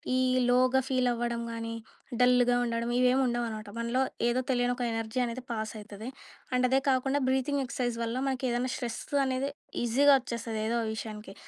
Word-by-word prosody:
ఈ - - +3 0.3
లోగా 255 +1 +4
ఫీల్ 255 -1 +1
అవ్వడం 235 0 -2
గాని, 230 0 -4 0.5
డల్‌గా 245 0 +5
ఉండడం 235 0 -1
ఇవేమి 255 +1 +4
ఉండవు 240 0 0
అనమాట. 215 -1 -7
మనలో, 235 +2 0 0.3
ఏదో 250 +2 +1
తెలియని 245 -1 +2
ఒక 250 - -3
ఎనర్జీ 225 +2 -2
అనేది 240 +2 -5
పాస్ 220 -2 -3
అయితది. 210 +2 -8 0.4
అండ్ 250 0 +3
అదే 265 +1 +4
కాకుండా 270 +2 +1
బ్రీతింగ్ 265 +2 +1
ఎక్ససైజ్ 245 -2 -2
వల్ల 230 +1 -2
మనకేదన్నా 255 -1 -1
స్ట్రెస్ 240 -3 -4 0.2
అనేది 260 +2 -1 0.3
ఈజీగా 275 +5 +5
వచ్చేస్తది, 230 -3 -4
ఏదో 230 - 0
ఒక 225 - -2
విషయానికి. 215 -2 -7
245 Hz, 165 wpm, -29 LUFS, 230-255 Hz, 0.5 s, డల్‌గా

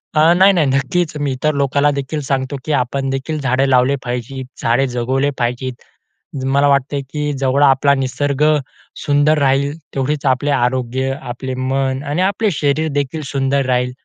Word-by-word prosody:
अ, 160 +3 +5
नाही, 190 +1 +6
नाही 165 -6 +2
नक्कीच. 140 +5 0
मी 145 -2 -1
इतर 150 +4 0
लोकाला 140 +1 +2
देखील 145 +2 -3
सांगतो 135 0 -2
की 155 - -2
आपण 135 +2 -2
देखील 135 +4 -3
झाडे 135 0 +1
लावले 130 +2 +3
पाहिजे, 125 +2 -4 0.2
झाडे 125 +4 +2
जगवले 130 +3 0
पाहिजे. 125 +2 -1 0.8
मला 140 +2 +3
वाटते 140 0 +1
की 150 +2 -3
जवळ 135 +1 +2
आपला 140 0 +4
निसर्ग 135 +2 -1 0.6
सुंदर 145 +2 +3
राहील 140 +2 +1 0.2
तेवढेच 145 +2 -1
आपले 135 +2 +1
आरोग्य, 130 0 0
आपले 125 +2 -5
मन 130 +1 -1
आणि 150 +5 -1
आपले 200 +2 +1
शरीर 155 0 0
देखील 145 +2 -2
सुंदर 135 0 0
राहील. 125 0 0
135 Hz, 160 wpm, -17 LUFS, 130-145 Hz, 0.8 s, नाही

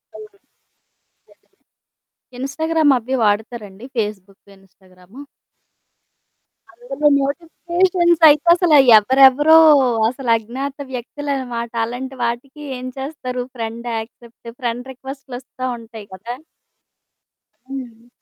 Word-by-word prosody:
అవును 430 - -10 0.8
నిజంగానే. - - -30 0.9
ఇన్‌స్టాగ్రామ్ 310 +2 +1
అవి 255 +3 -3
వాడతారండి? 210 0 -3
Facebook 200 -2 -5
Instagram? 190 +4 -19 1.5
అందులో 485 -11 -2 0.2
నోటిఫికేషన్స్ 345 +3 0
అయితే 300 +3 +2
అసల 345 -3 +2 0.3
ఎవ్వరెవరో, 270 +7 +5 0.5
అసలు 255 -1 -6
అజ్ఞాత 260 +5 -6 0.2
వ్యక్తులనమాట. 250 -2 -5
అలాంటి 260 +3 -7
వాటికి 250 +5 -4 0.2
ఏం 250 +1 -7
చేస్తారు? 260 -3 -5
ఫ్రెండ్ 230 0 -6
యాక్సెప్ట్ 235 +1 -12
ఫ్రెండ్ 245 +1 -4
రిక్వెస్ట్‌ 270 +1 -11
లోస్తా 255 +1 -6
ఉంటాయి 225 -2 -12
కదా! 230 +6 -7 1.3
హ్మ్. 245 -3 -9
255 Hz, 90 wpm, -19 LUFS, 230-285 Hz, 1.5 s, ఎవ్వరెవరో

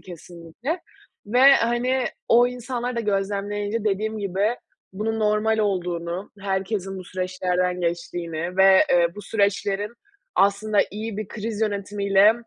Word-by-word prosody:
kesinlikle 175 - -7 0.5
ve, 245 +4 +2
hani, 245 +2 +1 0.2
o 240 +1 +6
insanları 245 0 -4
da - - +1
gözlemleyince 205 +1 -2
dediğim 215 +2 -1
gibi 200 +4 0 0.4
bunun 220 +3 -2
normal 215 +1 +2
olduğunu, 180 -3 -2
herkesin 195 0 -2
bu 185 - -8
süreçlerden 180 0 -1
geçtiğini 170 0 -3
ve, 190 0 +7
eee, 170 -1 +4
bu 205 - -7
süreçlerin 200 0 0 0.4
aslında 200 +1 +2
iyi 215 0 -5
bir 215 -2 -5
kriz 215 -1 -5
yönetimiyle 200 -1 +3
200 Hz, 120 wpm, -24 LUFS, 185-220 Hz, 0.5 s, ve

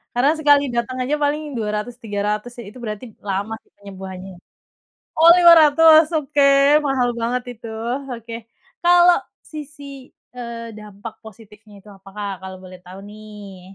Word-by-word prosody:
karena 270 +5 +3
sekali 290 -2 +4
dateng 240 +2 -3
aja 290 +4 -1
paling 295 +2 0 0.2
Rp200.000-Rp300.000 210 0 -4
ya 235 - -8
itu 250 - -14
berarti 215 +2 -6 0.2
lama 200 +3 -3
sih - - -36
penyembuhannya, 190 -1 -10 0.9
oh 330 +1 +6
Rp500.000 320 -2 +6
oke 290 -1 -1 0.5
mahal 255 -2 0
banget 245 +2 -2
itu 230 0 -12 0.4
oke, 230 -1 -8 0.5
kalau 350 0 +5 0.3
sisi, 295 -1 -10 0.5
eee, 235 -2 -8
dampak 210 +1 -10
positifnya 215 -1 -16
itu 195 - -26
apa 195 0 -16
Kak 205 -1 -4
kalau 190 0 -9
boleh 185 0 -12
tahu 185 +2 -11
nih? 210 -3 -12
230 Hz, 135 wpm, -20 LUFS, 205-285 Hz, 0.9 s, oh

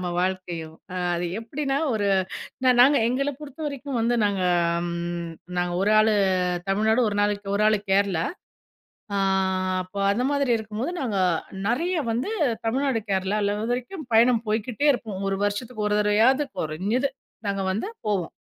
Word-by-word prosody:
நம்ம 180 - -3
வாழ்க்கையும் 175 -4 -3 0.4
அது 175 +1 -1
எப்டின்னா 275 +4 -2 0.2
ஒரு 205 -2 0 0.6
நா - - +5
நாங்க 280 +2 +6
எங்கள 275 +3 0
பொறுத்த 295 +1 -10
வரைக்கும் 280 -3 -4
வந்து 235 +2 +2
நாங்க 200 -2 0 0.5
ம் 170 0 -4 0.3
நாங்க 175 0 0
1 205 - +2
ஆளு 215 0 +4 0.6
தமிழ்நாடு 220 +4 +2
1 205 - -2
நாள 205 0 +2 0.2
1 210 - +2
ஆளு 215 -1 +3
கேரளா. 190 -4 +2 0.9
ஆ - - +1 0.7
அப்போ 190 +2 -8
அந்த 240 +5 0
மாதிரி 280 -3 +1
இருக்கும்போது 220 +8 -4
நாங்க 220 -6 -1 0.5
நறைய 335 +10 0 0.2
வந்து 245 - -1 0.4
தமிழ்நாடு 260 0 +1
கேரளால 200 +2 0
இது 225 +2 -2
வரைக்கும் 285 +5 -5
பயணம் 230 0 +5
போய்க்கிட்டே 230 +6 0
இருப்போம் 210 -6 -4
1 195 - -1
வருஷச்சுக்கு 210 +2 -2
1 210 0 +1
தரவையாவது 230 +8 +3
கொறஞ்சது 200 - 0 0.4
நாங்க 195 -1 -1
வந்து 215 - -2 0.2
போவோம். 195 -5 0
215 Hz, 145 wpm, -25 LUFS, 195-255 Hz, 0.9 s, நாங்க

